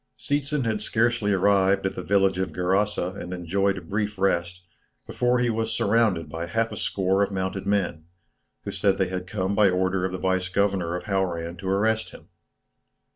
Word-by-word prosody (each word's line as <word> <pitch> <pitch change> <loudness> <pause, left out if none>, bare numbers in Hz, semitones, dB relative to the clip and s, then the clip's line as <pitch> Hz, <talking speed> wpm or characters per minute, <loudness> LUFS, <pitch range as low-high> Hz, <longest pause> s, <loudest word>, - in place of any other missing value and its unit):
Seetzen 145 -1 -1
had 110 -2 -1
scarcely 115 -1 +1
arrived 95 0 +3
at 95 - 0
the - - -5
village 95 -2 +2
of 95 -3 -1
Gerasa 95 +1 0
and 90 - -7
enjoyed 95 +2 0
a - - -5
brief 105 +4 -3
rest, 90 -2 0 0.4
before 125 0 +1
he 120 -1 +1
was 115 0 -2
surrounded 105 -7 +2
by 80 +3 -5
half 115 +6 0
a - - -5
score 95 0 0
of 100 - +2
mounted 95 0 -3
men, 95 -6 0 0.6
who - - -4
said 95 -1 +1
they 95 -2 0
had 90 0 -4
come 95 -1 -2
by 100 -1 +5
order 95 0 0
of 95 - -1
the 95 - -3
vice 95 -1 0
governor 95 -3 0
of 90 - -4
Hauran 90 -4 -2
to 95 +1 -5
arrest 110 +3 +1
him. - - -15
95 Hz, 185 wpm, -25 LUFS, 90-105 Hz, 0.6 s, by